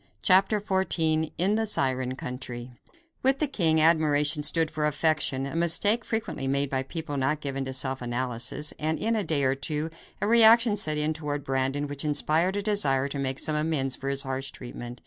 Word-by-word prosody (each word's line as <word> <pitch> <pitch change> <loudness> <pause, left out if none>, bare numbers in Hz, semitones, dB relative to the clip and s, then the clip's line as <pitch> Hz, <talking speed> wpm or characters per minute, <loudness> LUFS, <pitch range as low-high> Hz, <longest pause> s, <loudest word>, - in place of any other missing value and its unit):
CHAPTER 195 +3 +4
XIV 165 -6 0
In 190 +5 +2
the 220 +1 0
Siren 130 -8 0
Country 125 -1 -7 0.5
With 265 +1 +3
the 305 - 0
king, 165 - 0
admiration 155 -2 +2
stood 160 +1 +1
for 150 -2 -1
affection, 150 -3 +1
a 140 - -6
mistake 170 +7 +2
frequently 220 -11 -4
made 140 0 0
by 130 -1 0
people 145 +1 -5
not 135 +3 0
given 135 -2 -4
to 130 - -5
self 130 0 -2
analysis, 125 +4 0
and 155 +1 -1
in 230 +1 -1
a 215 - -1
day 155 -5 -1
or 130 0 +2
two 150 +3 -3 0.3
a - - -1
reaction 230 0 +6
set 155 -6 +2
in 150 +1 0
toward 145 -2 -4
Brandon 135 +1 -1
which 145 0 -5
inspired 155 +5 +1
a 205 - -2
desire 140 -11 +1
to 140 - -5
make 135 -1 -2
some 155 - 0
amends 150 -4 -1
for 135 - -5
his 140 0 +1
harsh 135 0 -3
treatment. 120 0 -9
150 Hz, 190 wpm, -26 LUFS, 135-170 Hz, 0.5 s, reaction